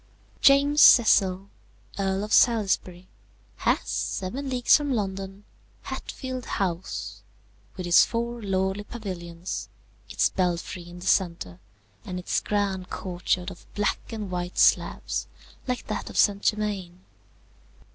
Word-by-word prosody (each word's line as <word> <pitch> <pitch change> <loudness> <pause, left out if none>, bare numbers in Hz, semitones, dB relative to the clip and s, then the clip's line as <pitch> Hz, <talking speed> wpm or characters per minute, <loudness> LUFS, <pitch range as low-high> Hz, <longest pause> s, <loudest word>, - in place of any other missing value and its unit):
"James 285 +2 +5
Cecil, 195 -5 +6 0.5
Earl 195 0 0
of 210 - -3
Salisbury, 190 -6 +2 0.5
has, - - +1
seven 255 +9 -3
leagues 250 -2 +4
from 290 -2 0
London, 195 -3 -3 0.4
Hatfield 255 -2 -6
House, 185 -2 -3 0.6
with 185 - -4
its 175 0 +7
four 235 0 -3
lordly 190 0 -1
pavilions, 180 -6 -6 0.4
its - - +1
belfry 175 -1 -2
in 175 0 -11
the - - -8
centre, 170 - 0 0.4
and 185 -5 -6
its 180 - -1
grand 195 -3 -2
courtyard 180 0 -2
of 175 - -15
black 205 0 0
and 210 -4 -5
white 180 0 -4
slabs, - - +2 0.4
like 250 -1 -2
that 215 - -4
of - - -8
St. 200 -1 +3
Germain. 200 -5 -2
195 Hz, 120 wpm, -26 LUFS, 180-220 Hz, 0.6 s, its